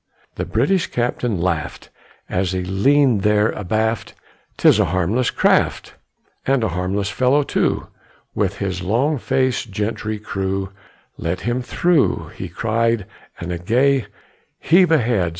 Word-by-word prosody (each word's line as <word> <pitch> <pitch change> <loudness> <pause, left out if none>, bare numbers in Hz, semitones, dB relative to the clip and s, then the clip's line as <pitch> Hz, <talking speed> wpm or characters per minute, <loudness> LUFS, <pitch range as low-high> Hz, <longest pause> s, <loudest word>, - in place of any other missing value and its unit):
The - - -4
British 165 - +1
captain 120 -3 -1
laught 85 -3 -2 0.4
As 90 0 -1
he 90 -1 -2
leaned 120 +4 +3
there 105 +1 +3
abaft: 110 +3 -2 0.4
"'Tis - - +5
a - - +4
harmless 95 +8 0
craft, - - +1 0.5
"And 135 -3 +2
a 110 - +1
harmless 95 +3 -2
fellow 130 +5 +2
too, - - 0 0.5
With 100 -1 -1
his 95 -3 -3
long 125 - +1
faced 130 -1 0
gentry 105 +1 -3
crew; 95 -2 -3 0.5
Let 85 +2 -3
him 120 +2 -1
through," 170 +4 +1
He - - -7
cried; 115 -1 0 0.3
and 85 - -5
a 85 - -3
gay 125 +5 +2 0.5
"Heave 175 +1 +4
ahead!" 115 - +2
110 Hz, 135 wpm, -20 LUFS, 95-125 Hz, 0.5 s, Tis